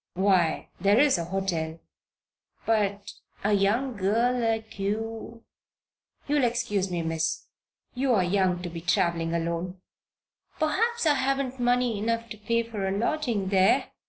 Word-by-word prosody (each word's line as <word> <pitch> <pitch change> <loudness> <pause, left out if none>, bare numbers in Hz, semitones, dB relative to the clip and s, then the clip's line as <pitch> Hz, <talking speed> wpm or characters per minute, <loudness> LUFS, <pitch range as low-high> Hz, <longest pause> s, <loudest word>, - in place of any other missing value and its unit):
"Why 185 -4 +2
there's 205 +5 +4
a 170 - -2
hotel. 170 -4 -2 0.9
But 205 -2 0 0.3
a 210 +1 +2
young 220 +6 +1
girl 225 +6 +2
like 225 -3 -2
you 225 +3 -4 0.8
You'll 290 -1 +2
excuse 230 -5 0
me, 175 -2 -2
Miss. 165 +1 -1 0.5
You're 250 -6 +2
young 180 -1 +1
to 175 - -4
be 165 0 -6
traveling 170 -1 +1
alone." 170 +2 -3 0.8
"Perhaps 435 +9 +1
I 300 - +5
haven't 270 -1 -1
money 245 -2 +1
enough 230 +2 -1
to 215 - -7
pay 230 +2 0
for 215 -4 -4
a - - 0
lodging 235 -5 -1
there?" 190 -1 +3
210 Hz, 130 wpm, -27 LUFS, 185-240 Hz, 0.9 s, I